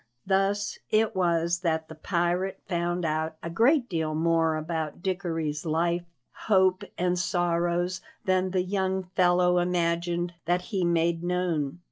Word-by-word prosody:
Thus 195 +1 0
it 215 -1 +2
was 170 -1 +1
that 160 -3 -1
the - - -9
pirate 175 +3 -1
found 175 -1 -1
out 160 0 -1
a 170 - -4
great 245 - +3
deal 160 -5 -2
more 165 0 +2
about 160 +1 -4
Dickory's 165 -6 -2
life, 170 +2 0 0.4
hope, 190 -2 +4
and 180 0 +1
sorrows 175 0 0 0.2
than 185 -1 +2
the 185 -1 0
young 190 0 -1
fellow 180 -1 +4
imagined 175 0 0
that 175 +2 +1
he 190 -2 +1
made 170 -1 +1
known. 175 -5 -1
175 Hz, 135 wpm, -27 LUFS, 165-185 Hz, 0.4 s, hope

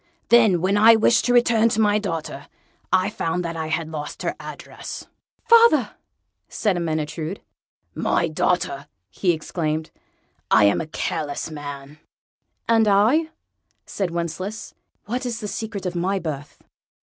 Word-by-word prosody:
Then, 220 -8 +5
when 195 +3 +2
I 225 +2 +7
wished 225 +2 +3
to 245 - +2
return 235 -2 +4
to 220 - -1
my 210 -1 +3
daughter, 165 -8 -5 0.4
I 185 +2 +2
found 180 -3 -2
that 170 0 -4
I 160 -1 -3
had 165 0 -2
lost 150 -2 -6
her - - -2
address." - - -8 0.4
"Father!" 460 - +5 0.6
said 205 -4 0
Ermyntrude. 160 +1 -3 0.5
"My 170 - 0
daughter," 155 -3 -1 0.2
he 180 - +1
exclaimed, 155 -1 -3 0.6
"I - - +5
am 100 +7 +3
a 160 - -6
careless 155 0 -3
man!" 145 -1 -8 0.7
"And 225 -1 +4
I?" 225 +11 +3 0.6
said 195 -3 -3
Wencheslaus 175 +6 -5 0.3
"what 245 +4 -3
is 240 -2 -3
the 210 - -5
secret 210 -2 -5
of 180 - -2
my 185 +3 0
birth?" 150 -5 -6
180 Hz, 140 wpm, -22 LUFS, 160-220 Hz, 0.7 s, I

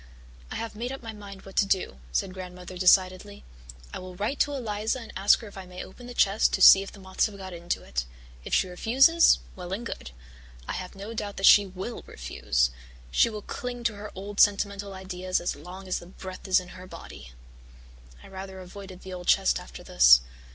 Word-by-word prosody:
"I - - -6
have 230 -1 -5
made 240 +4 -4
up 270 -2 -7
my 225 -1 -6
mind 200 -2 -11
what 195 - -12
to - - +5
do," 180 - 0
said 185 - -1
Grandmother 180 -1 -9
decidedly. 185 +2 +3 0.5
"I - - -4
will 185 0 -9
write 210 +9 -2
to 290 - +2
Eliza 220 -1 -2
and 230 - -10
ask 195 +2 +4
her 225 - -9
if 200 -1 -10
I 185 - -9
may 180 0 -7
open 245 +6 -13
the 245 - -9
chest 200 0 +3
to - - 0
see 195 - +10
if 195 - -7
the 205 - -14
moths 190 +2 0
have 205 -2 -11
got 190 -1 -8
into 170 0 -3
it. 65 -1 -3 0.4
If - - -8
she - - +3
refuses, 265 - +5 0.2
well 180 -1 -8
and 215 +5 -3
good. 130 - -6 0.6
I - - -3
have 185 +1 -6
no 200 +4 -7
doubt 205 -2 -5
that 195 - +1
she 205 -1 +8
will 190 +5 -6
refuse. 60 0 -1 0.4
She 235 - +4
will 210 -2 -7
cling 245 -1 -5
to 235 -2 +1
her 210 +1 -8
old 200 +2 -6
sentimental 200 -1 +2
ideas 185 -1 -2
as 175 - -2
long 180 +5 -10
as 185 - -1
the 175 - -13
breath 185 +1 -9
is 190 - +5
in 180 -1 -10
her 185 0 -11
body." - - -11 0.9
I - - -12
rather 190 0 -8
avoided 185 0 -10
the 190 - -8
old 180 -1 -8
chest - - +4
after - - -11
this. - - +7
195 Hz, 215 wpm, -27 LUFS, 185-210 Hz, 0.9 s, see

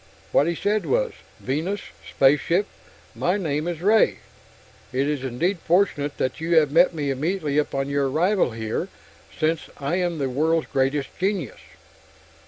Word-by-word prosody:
What 145 - +4
he 170 - 0
said 210 +5 0
was: - - +1 0.3
"Venus. 165 +10 -2 0.3
Spaceship. 150 +8 +3 0.5
My 180 +3 0
name 155 -4 -2
is 175 -1 -4
Ray. 215 +2 +4 0.7
It 135 +2 0
is 145 -3 -2
indeed 165 +9 -1
fortunate 165 -5 +1
that 130 +4 -2
you 165 +1 +1
have 150 -3 +4
met 170 +2 +4
me 145 -3 -1
immediately 150 +1 0
upon 135 -2 -1
your 140 -1 0
arrival 180 +4 +2
here, 110 -1 -3 0.5
since 160 +1 0
I 145 +5 -1
am 175 -2 -1
the 140 -3 -1
world's 155 +5 +1
greatest 135 0 0
genius...." 185 - -1
155 Hz, 150 wpm, -24 LUFS, 140-180 Hz, 0.7 s, What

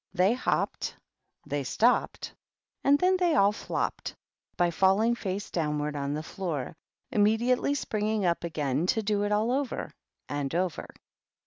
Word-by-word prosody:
They 185 +5 +4
hopped, 255 - -1 0.5
thej 145 -1 -2
stopped, 230 - +1 0.5
and 280 +1 +5
then 370 +4 +3
they 350 -3 +2
all 200 -5 +5
flopped, 210 - -3 0.4
by 175 -1 +3
falling 195 +7 +3
face 200 -3 -4
downward 150 -2 -1
on 140 0 -2
the 155 - -4
floor, 160 -6 -4 0.4
immediately 235 +5 +2
spring 215 -6 -2
ing 215 -3 0
up 170 -1 +1
again 150 -1 -1
to 220 +3 +1
do 205 0 +1
it 205 - -2
all 215 +3 +2
over 270 0 -2 0.4
and 145 0 -3
over. 180 -2 -1
200 Hz, 145 wpm, -28 LUFS, 160-230 Hz, 0.5 s, and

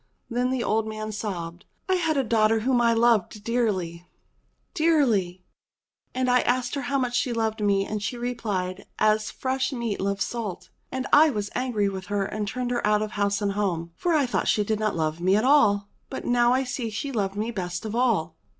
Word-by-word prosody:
Then 245 +2 +1
the 255 -2 -1
old 220 +1 0
man 215 0 -5
sobbed, 180 -5 -5 0.2
*'I 375 - +2
had 325 -5 +1
a 270 - +2
daughter 220 -1 +2
whom 245 +1 +2
I 235 -1 +4
loved 225 -3 +2
dearly, 190 -8 -1 0.7
dearly. 245 - +2 0.7
And 255 0 0
I 250 0 +4
asked 245 0 0
her 280 - -2
how 275 +2 -1
much 250 -2 -1
she 245 - +1
loved 220 -1 -1
me, 200 -1 +2
and 210 0 -4
she 240 +4 -3
replied, 210 -7 -3
*As 215 0 +2
fresh 260 +1 -2
meat 235 -6 -3
loves 200 0 0
salt.' 225 -6 -5 0.2
And 260 0 -3
I 310 +2 +8
was 210 -6 -3
angry 245 -5 0
with 190 -1 -5
her 205 -1 0
and 210 +1 -3
turned 245 +3 -3
her 245 - -1
out 210 0 +3
of 215 - -5
house 200 0 0
and 200 - +1
home, 180 -5 -2
for 345 -2 0
I 290 -3 +3
thought 245 - -1
she 210 - +3
didn't 215 0 -1
love 160 0 -1
me 185 +2 +3
at 215 +3 +2
all. 210 -8 +4 0.2
But - - -6
now 240 0 +3
I 260 +1 +2
see 250 -2 -3
she 220 +6 -4
loved 200 -5 -1
me 215 +3 -2
best 180 -2 -4
of 220 +1 -4
all." 210 -10 +1
220 Hz, 205 wpm, -25 LUFS, 200-245 Hz, 0.7 s, I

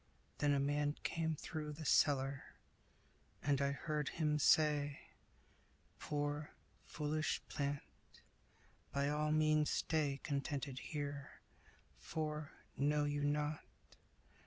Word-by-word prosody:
Then 145 -1 +3
a - - +2
man 145 +1 +1
came 160 -1 0
through 150 0 -5
The 155 +1 -7
cellar, 135 -1 +2 0.9
and 140 -1 +2
I 140 0 +2
heard 150 0 -2
him 150 -2 +1
say, 145 -1 +4 1.0
"Poor, 145 0 -2 0.3
foolish 155 +1 -1
plant, 140 0 -1 1.1
by 140 0 +1
all 150 +1 +1
means 155 -1 +4
stay 145 -3 +1
Contented 140 -2 -2
here; 145 -2 -4 0.7
for 155 -1 -3 0.2
know 145 +1 +2
you 145 0 0
not? 150 +1 0
145 Hz, 105 wpm, -38 LUFS, 140-150 Hz, 1.1 s, say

